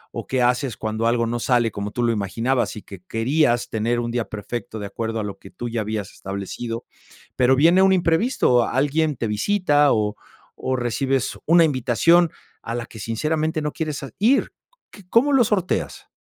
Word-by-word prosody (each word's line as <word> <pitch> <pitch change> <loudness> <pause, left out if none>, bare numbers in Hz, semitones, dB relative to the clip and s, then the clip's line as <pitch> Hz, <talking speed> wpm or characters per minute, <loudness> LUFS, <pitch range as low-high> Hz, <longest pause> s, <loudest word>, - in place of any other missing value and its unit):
o, - - -5
qué 130 -1 +1
haces 125 0 0
cuando 110 +1 -2
algo 115 0 +2
no 120 +1 -2
sale 120 -2 +2
como 100 0 -4
tú 120 +3 -3
lo 115 - +2
imaginabas, 115 +7 -1
y 105 - -9
que 95 -3 -11
querías 120 - +1
tener 115 +2 0
un 120 0 -2
día 120 -2 -1
perfecto 110 +2 -6
de 105 - -5
acuerdo 110 +2 -4
a - - -2
lo 100 -1 -6
que 95 - -13
tú 120 0 -6
ya 115 -1 -2
habías 105 -2 -4
establecido, 100 +5 -6 0.5
pero 130 +1 +4
viene 170 +7 +5
un 190 0 +5
imprevisto, 165 - +2
alguien 145 +3 +1
te 120 - -3
visita, 145 - +2
o 105 -1 0 0.4
o, 130 - -2
recibes 130 +2 -1
una 170 +1 +6
invitación 155 +5 +3 0.3
a 115 - -5
la 120 -1 -3
que 110 - -12
sinceramente 155 - -1
no 150 - -1
quieres 155 -4 -4
a 135 - -7
ir 250 +7 +2 0.4
qu - - -13
¿Cómo 275 +5 +3
lo 255 -3 +6
sorteas? 195 -4 -1
120 Hz, 190 wpm, -22 LUFS, 115-155 Hz, 0.5 s, una